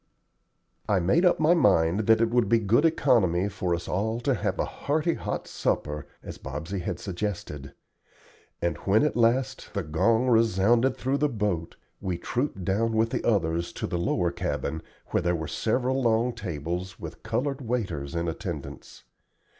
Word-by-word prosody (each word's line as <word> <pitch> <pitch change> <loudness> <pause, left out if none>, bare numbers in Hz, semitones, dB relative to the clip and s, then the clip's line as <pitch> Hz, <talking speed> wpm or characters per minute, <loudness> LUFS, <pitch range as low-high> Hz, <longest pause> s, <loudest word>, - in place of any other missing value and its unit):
I 100 -2 +3
made 95 - +3
up 180 - +4
my 155 +2 +5
mind 100 - +3
that 110 0 +5
it 115 0 +2
would 120 -4 +2
be 115 - +5
good 115 +7 +3
economy 115 - +3
for 95 -3 -1
us 85 +1 -7
all 110 +5 -1
to 135 +3 +1
have 120 - -1
a - - 0
hearty 155 +3 -1
hot - - -4
supper, 75 0 -2 0.2
as - - -8
Bobsey 80 +8 -5
had 85 0 -3
suggested; 85 -8 -5 0.9
and 85 -3 0
when, 100 - +2
at 150 - +1
last, 120 +2 +1
the 100 - 0
gong 95 +10 +2
resounded 115 +2 +3
through 135 +2 0
the 150 - +2
boat, 100 -8 -2 0.2
we 90 -2 -2
trooped 120 -1 -3
down 110 +5 +1
with 110 +1 +2
the - - -2
others 85 -6 +1
to - - -4
the 85 - -2
lower 85 0 +1
cabin, 80 -2 -3 0.3
where - - +1
there 90 0 +1
were 80 -2 -4
several 130 - 0
long 120 0 +2
tables, 90 -3 -5
with 80 0 -8
colored 130 +5 -2
waiters 95 - -3
in 85 0 -1
attendance. 80 -3 -6
105 Hz, 170 wpm, -27 LUFS, 85-120 Hz, 0.9 s, my